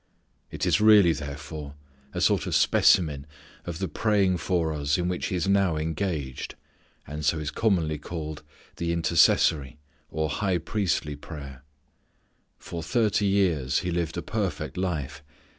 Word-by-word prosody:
It - - -3
is 90 +1 +2
really, 105 -6 +7
therefore, 75 0 -7 0.4
a - - -4
sort - - +2
of - - -1
specimen 75 -5 +3 0.4
of 85 -2 -5
the 95 +1 -2
praying 95 +1 +1
for 85 -2 0
us 75 0 0
in 90 -1 -1
which 90 -1 -2
He - - -2
is 90 +1 -1
now 100 -4 +3
engaged, 80 -4 -3 0.5
and 75 +2 -6
so 80 +2 +2
is 75 -1 -3
commonly 85 -9 +1
called 80 -1 -6 0.4
the 85 0 -1
intercessory 80 -4 +3 0.3
or 80 0 -1
high 95 +5 0
priestly 85 -4 -1
prayer. 70 -3 -9 0.9
For 85 - -7
thirty 105 +3 +1
years 85 -10 +1
He 90 -1 -2
lived 85 -1 -2
a 85 - -3
perfect 105 -2 -3
life. 80 -6 -3
85 Hz, 145 wpm, -26 LUFS, 75-95 Hz, 0.9 s, really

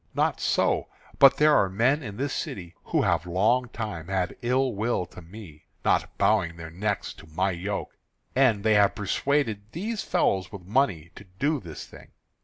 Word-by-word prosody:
Not - - +1
so. - - +1 0.3
But 135 - +7
there 150 0 +5
are 95 - +3
men 125 +10 +2
in 105 -4 -7
this 140 +1 -2
city 85 -3 -5
who - - +1
have 90 - +1
long 115 +8 +2
time 90 -9 -5
had 95 -1 -1
ill 130 +1 +1
will 105 -2 -1
to 90 - -13
me, 85 -4 -12 0.2
not - - +1
bowing 85 0 +2
their 80 -1 -8
necks 100 +3 -2
to - - -15
my 95 +5 0
yoke; 95 +4 -4 0.4
and 120 -6 +3
they 110 -1 +4
have 100 -1 +4
persuaded 110 +1 0
these 210 +6 -3
fellows 95 -2 0
with 100 -3 -9
money 95 - 0
to - - -12
do 150 +6 +1
this 85 -8 -9
thing. - - -15
105 Hz, 180 wpm, -26 LUFS, 90-125 Hz, 0.4 s, But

